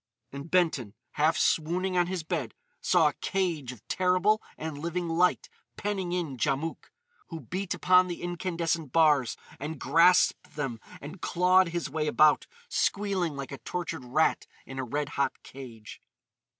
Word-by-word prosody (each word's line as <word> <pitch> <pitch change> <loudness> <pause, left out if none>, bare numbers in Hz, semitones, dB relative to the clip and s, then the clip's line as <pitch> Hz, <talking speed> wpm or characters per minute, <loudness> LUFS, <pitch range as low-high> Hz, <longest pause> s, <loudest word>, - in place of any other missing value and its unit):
And 140 +4 -8
Benton, 155 - +1 0.2
half 155 +2 +2
swooning 180 +4 +1
on 175 -1 +3
his 180 -2 -3
bed, 160 - -3 0.3
saw - - +4
a - - -8
cage 170 -9 -1
of 115 -4 -15
terrible 185 +4 +2 0.2
and 155 -2 -5
living 170 +2 -3
light 175 +2 +2 0.3
penning 195 -4 -2
in 170 -7 -2
Djamouk, 150 +5 -2 0.4
who 165 - -7
beat 190 +1 -4
upon 185 0 +4
the 175 -1 -6
incandescent 170 -3 -2
bars 150 -6 +3 0.2
and 150 +1 -5
grasped 180 +2 +3
them 135 -6 -3 0.2
and 155 +6 -9
clawed 185 +1 +4
his 170 -1 -3
way 150 +2 -2
about, 150 0 +4 0.2
squealing 195 - 0
like 140 0 -6
a 140 - -7
tortured 175 -7 -4
rat 150 +6 +1 0.2
in 130 0 -7
a - - -1
red 145 +3 -3
hot 140 - -2
cage. 120 -5 -11
165 Hz, 150 wpm, -28 LUFS, 145-180 Hz, 0.4 s, saw